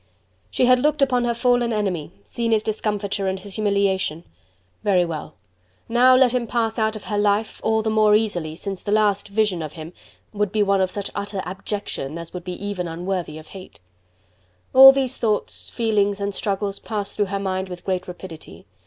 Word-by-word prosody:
She 255 - +2
had 255 0 +5
looked 300 +1 +2
upon 250 -3 +2
her 235 - +1
fallen 245 0 +2
enemy, 195 -8 -2
seen 230 - -2
his 215 -1 +2
discomfiture 205 -2 -2
and 190 0 -1
his 195 +1 -11
humiliation! 200 -5 0 0.6
Very 185 -4 +3
well! 155 -2 -6 0.5
Now 250 +2 +5
let 255 -1 +4
him 245 -2 0
pass 225 -1 -1
out 220 0 +1
of 215 - -8
her 205 -1 -2
life, 205 +1 0
all 220 0 +1
the 220 - 0
more 215 -1 +4
easily, 175 -8 -1
since 195 +2 -6
the 205 - -4
last 210 -2 +2
vision 205 -4 0
of 155 -1 -6
him 160 +1 -9 0.4
would 205 -2 -1
be 215 -1 +2
one 200 -1 +2
of 185 - +1
such 200 +1 -5
utter 200 -1 -4
abjection 185 -5 -5
as 170 -1 -9
would 180 0 -6
even 185 -1 -4
be - - -6
unworthy 175 -2 -3
of 155 - -12
hate. 190 -1 -12 0.9
All 270 +1 +11
these 265 -1 -1
thoughts, 215 -3 -1
feelings 205 -3 +1
and 200 0 -2
struggles 200 0 -2
passed 205 -3 -4
through 205 - +1
her 200 +1 -3
mind 190 -1 -2
with 180 -1 -9
great 185 -2 -2
rapidity. 175 -3 -10
205 Hz, 190 wpm, -22 LUFS, 185-220 Hz, 0.9 s, All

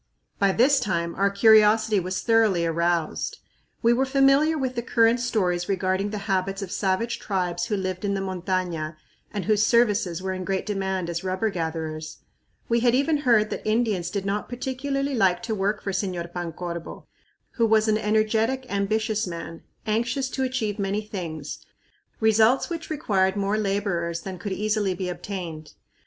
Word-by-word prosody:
By 200 -1 +4
this 265 +7 +4
time 170 -6 -1
our 200 +1 +2
curiosity 215 +1 +5
was 185 +1 -3
thoroughly 220 -7 +3
aroused. 170 0 0 0.5
We 235 +1 +5
were 265 +3 +1
familiar 275 +4 +4
with 260 -3 -1
the 235 - -2
current 230 0 +3
stories 185 -7 0
regarding 190 +1 0
the 210 - -4
habits 195 0 -1
of 185 - -7
savage 205 +4 -1
tribes 180 -3 -1
who 215 -3 -1
lived 185 0 -3
in 200 -1 0
the - - -1
montaña 180 -4 -2 0.4
and 205 -2 -4
whose 215 -1 +3
services 210 -7 +2
were 190 0 -3
in 185 0 -4
great 190 0 -2
demand 190 -3 -2
as 170 +1 -3
rubber 190 +3 -1
gatherers. 160 -2 -4 0.5
We 235 0 +2
had 240 +1 +3
even 295 +4 +2
heard 230 -7 +3
that - - -3
Indians 215 -5 0
did 200 -2 -3
not 200 +1 -2
particularly 275 +3 -2
like 190 -6 +2
to 230 -1 -2
work 205 +1 -1
for 195 - -2
Señor 180 -3 -3
Pancorbo, 170 -1 -6 0.5
who 230 -2 +1
was 220 0 +3
an 215 0 +2
energetic, 220 +4 +1
ambitious 215 +2 0
man, 170 -1 -7 0.2
anxious 245 +5 -1
to 265 - -3
achieve 250 -6 -1
many 200 +1 -1
things, 165 -8 -6 0.6
results 220 - +3
which 335 -1 -5
required 200 -11 +1
more 200 +1 0
laborers 195 -5 -1
than 190 -2 -7
could 205 - -5
easily 210 -1 0
be 180 0 -3
obtained. 175 -4 -6
200 Hz, 165 wpm, -25 LUFS, 185-225 Hz, 0.6 s, curiosity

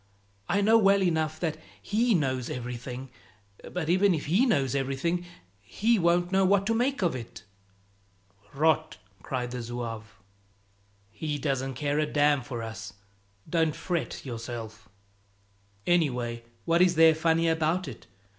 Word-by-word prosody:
I 200 - +2
know 220 +3 +5
well 200 -1 +4
enough 160 -3 0
that 160 -3 -1 0.2
He 230 +2 +1
knows 130 -5 -1
everything, 125 +1 -6 0.6
but 180 -3 -3
even 185 +2 +4
if 150 - -4
He 195 - +3
knows 135 - +1
everything, 140 +6 -1 0.3
He 220 - +1
won't 175 +1 +2
know 195 0 +3
what 195 +1 +3
to 225 - +1
make 250 +1 0
of 170 -6 +1
it." 115 -3 -8 1.1
"Rot!" 155 +1 +2 0.2
cried 125 +1 -3
the 125 0 -4
zouave. 115 -2 -6 0.9
"He 145 +8 -3
doesn't 135 -2 -2
care 145 +2 -1
a 155 - +1
damn 145 -1 +3
for 120 -1 -6
us, 110 -1 -7 0.5
don't 160 -1 +1
fret 175 -5 -3
yourself." 115 -2 -7 1.0
"Anyway, 125 -9 0 0.2
what 170 +1 +3
is 180 -1 +4
there 160 0 +7
funny 165 +1 +2
about 160 +2 +1
it? 130 - -10
155 Hz, 140 wpm, -28 LUFS, 125-175 Hz, 1.1 s, there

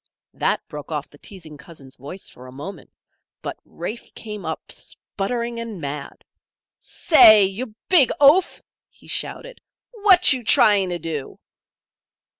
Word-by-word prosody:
That - - -1
broke 150 +1 -9
off 150 -2 -4
the 145 - -18
teasing 165 -7 -10
cousin's 140 -3 -12
voice 145 +9 -9
for 125 +1 -13
a - - -12
moment; 150 +4 -9 0.5
but - - -6
Rafe 210 +8 -8
came 210 -4 -8
up, 160 - -6
sputtering 235 +3 -5
and 230 -5 -7
mad. 140 -1 -7 0.5
"Say! 215 - +6
You 215 +4 -5
big 315 -10 +5
oaf!" 295 +6 +4 0.3
he - - -23
shouted. - - -4 0.3
"What 400 -8 +5
you 255 -2 -4
trying 210 -6 +4
to 175 - -3
do?" 155 -5 -6
195 Hz, 135 wpm, -22 LUFS, 150-240 Hz, 0.5 s, Say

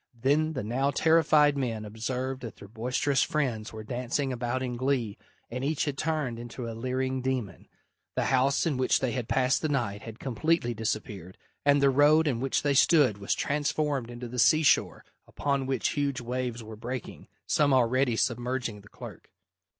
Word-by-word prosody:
Then 150 +5 +2
the 130 - -3
now 130 +6 0
terrified 150 -1 +4
men 115 -6 -2
observed 125 +5 -4
that 115 -3 -7
their 100 - -12
boisterous 125 +5 0
friends 120 -7 -1
were 110 0 -8
dancing 125 +4 -2
about 125 +1 -2
in 125 -1 -3
glee 125 -4 -1 0.4
and 125 +2 -4
each 150 +1 0
had 145 -2 -2
turned 150 -7 -2
into 120 0 -7
a 115 - -5
leering 130 +2 -2
demon. 125 -7 -3 0.5
The - - 0
house 135 +4 +2
in 150 -6 0
which 130 - +2
they 130 -2 -1
had 125 -3 -3
passed 130 0 +2
the 155 - -1
night 115 -8 -1
had 115 -1 -9
completely 130 +1 0
disappeared, 105 -4 -4 0.3
and 145 0 +4
the 140 - +5
road 150 +3 +5
in 125 -5 0
which 135 +1 0
they 145 -1 +2
stood 140 - +4
was 100 - -1
transformed 145 -3 -1
into 120 0 -7
the 125 +1 -5
sea 155 +6 +5
shore, 145 - +2 0.2
upon 140 -2 -1
which 130 -4 0
huge 140 -2 -1
waves 120 -1 -3
were 110 0 -9
breaking, 120 +2 -7 0.2
some 145 -2 +2
already 130 -1 +3
submerging 120 -2 -2
the 100 - -17
clerk. - - -11
130 Hz, 180 wpm, -28 LUFS, 115-140 Hz, 0.5 s, the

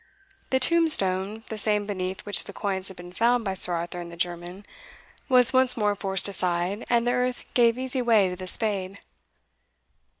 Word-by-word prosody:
The 260 - +1
tombstone, 220 - +2
the 220 - -4
same 210 0 0
beneath 185 -2 -5
which 205 - 0
the - - -10
coins 190 -2 -3
had 190 - -6
been 175 0 -11
found 235 +4 +1
by 195 - -2
Sir 180 -1 +5
Arthur 175 +1 -4
and 170 0 -9
the 170 - -11
German, 175 +3 -4 0.6
was 250 -1 +4
once 260 -1 +3
more 210 -2 +1
forced 195 -1 0
aside, 180 +1 -2
and 235 -1 +2
the 245 - +1
earth 250 0 -2
gave 235 -1 +3
easy 260 0 -3
way 225 -5 +3
to 180 - -5
the 185 0 -9
spade. 195 -2 0
205 Hz, 180 wpm, -25 LUFS, 185-240 Hz, 0.6 s, Sir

